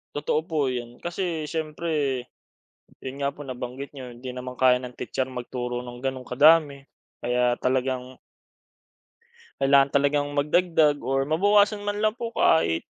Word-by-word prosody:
Totoo 150 +1 0
po 155 -5 -1
iyon. 120 -1 -5
Kasi 175 -3 -3
siyempre 155 -4 -2 0.8
'yon 135 +1 -6
nga 140 0 -1
po, 145 - -9
nabanggit 130 +1 -6
niyo, 130 -4 -9
hindi 125 +2 -8
naman 125 0 -7
kaya 125 0 +4
ng 125 -1 -8
titser 130 - -3
magturo 125 -1 -4
nung 120 0 -9
gano'ng 130 0 -3
kadami. 140 +1 +4 0.3
Kaya 125 0 +1
talagang 130 0 -1 1.4
kailangan 135 0 +4
talagang 145 +1 +1
magdagdag 150 0 +3
or 135 +1 +1
mabawasan 205 +5 +3
man 205 0 -2
lang 215 +2 +1
po 235 -1 -5
kahit 80 - +3
135 Hz, 140 wpm, -25 LUFS, 125-155 Hz, 1.4 s, kaya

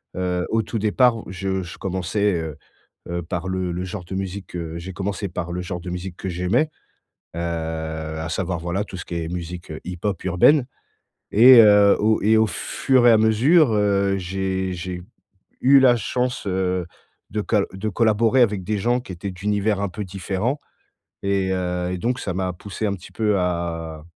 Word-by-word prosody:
heu, 90 -1 -1
au 115 - +2
tout 115 - -4
départ, 115 +3 +3
je 95 +1 -2
je 85 - -9
commençais, 95 +2 -1
heu 80 -2 -6 0.5
heu, 85 0 -2
par 90 +1 -4
le 95 -1 -2
le 90 +1 -3
genre 90 0 -6
de 95 - -6
musique, 95 0 -5
heu, 85 -1 -5
j'ai 95 +2 -7
commencé 100 +2 -3
par 85 0 -4
le 90 +1 -3
genre 90 -1 -5
de 90 - -7
musique 90 0 -6
que - - -5
j'aimais, 90 - +1 0.7
heu - - -3
à 80 -1 -4
savoir, 90 -1 -2
voilà, 85 +4 -2
tout 100 - -9
ce 90 - -6
qui - - -7
est 80 -1 -3
musique 85 0 -6
heu 80 - -6
hip-hop 90 +1 -3
urbaine 120 - +4 0.7
et 120 +3 +9
heu, 105 -2 +6
au 110 +1 +2
et 110 +2 +4
au 110 - +4
fur 120 +7 +1
et - - +8
à 110 - +6
mesure, 120 +7 +4
heu, 100 -2 +2
j'ai 95 0 -2
j'ai 90 0 -5 0.6
eu 135 +2 +7
la 130 -2 +6
chance, 125 +3 -2
heu, 90 -1 0 0.5
de 105 - -1
col 105 -1 +1
de 100 +3 -3
collaborer 115 +4 +2
avec 105 -5 +2
des 105 +3 -1
gens 120 +5 +1
qui 110 - -10
étaient 95 +3 -5
d'univers 100 +2 -1
un 100 - -1
peu 105 +4 -5
différents. 95 +9 -2 0.6
Et 100 -1 0
heu, 90 -1 -2
et 90 - -2
donc 125 +7 -1
ça 90 - -3
m'a 95 -1 -1
poussé 100 +5 -5
un 100 - 0
petit 90 - -13
peu 105 -3 +1
à 85 -3 -3
95 Hz, 190 wpm, -22 LUFS, 90-105 Hz, 0.7 s, et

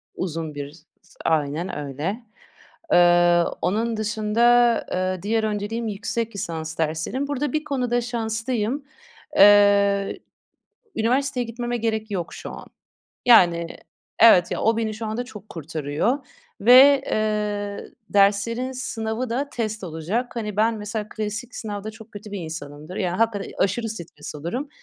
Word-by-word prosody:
Uzun 160 -4 -4
bir 145 0 -6
s 155 - -19 0.4
Aynen 155 +2 0
öyle. 150 - -4 0.7
Eee, 175 0 +5 0.2
onun 225 +4 0
dışında, 230 +3 +3
eee, 185 0 -1
diğer 220 +2 +1
önceliğim 215 +2 -2
yüksek 220 +2 -3
lisans 160 -4 -4
derslerim. 160 - -1
Burada 285 -1 -2
bir 310 0 0
konuda 250 -4 0
şanslıyım. 235 +2 -2 0.5
Eee, 200 -1 +5 0.8
üniversiteye 250 +3 +1
gitmeme 240 +1 -3
gerek 220 -1 -2
yok 175 -4 -3
şu - - -8
an. - - -10 0.6
Yani 175 -8 +6 0.5
Evet, 205 -6 +7
ya, - - -2
o 225 0 +3
beni 220 -1 -1
şu 220 +1 -5
anda 220 +3 -3
çok 215 -4 -12
kurtarıyor 160 - -2 0.4
ve, 265 +4 +8
eee, 210 -1 -2 0.2
derslerin 205 +6 +2
sınavı 230 -1 -3
da 270 +5 -1
test 220 -5 -3
olacak. 180 +9 -3
Hani, 210 -3 -4
ben 225 +2 +3
mesela 210 0 -4
klasik 215 +4 -5
sınavda 210 -1 -5
çok 220 0 -14
kötü 205 0 -9
bir 200 - -3
insanımdır. 155 +1 -7
Ya, 180 -2 -1
hakikaten 220 -3 0
aşırı 225 +4 0
stres 170 -9 -8
olurum. 175 - -4
215 Hz, 135 wpm, -23 LUFS, 180-230 Hz, 0.8 s, ve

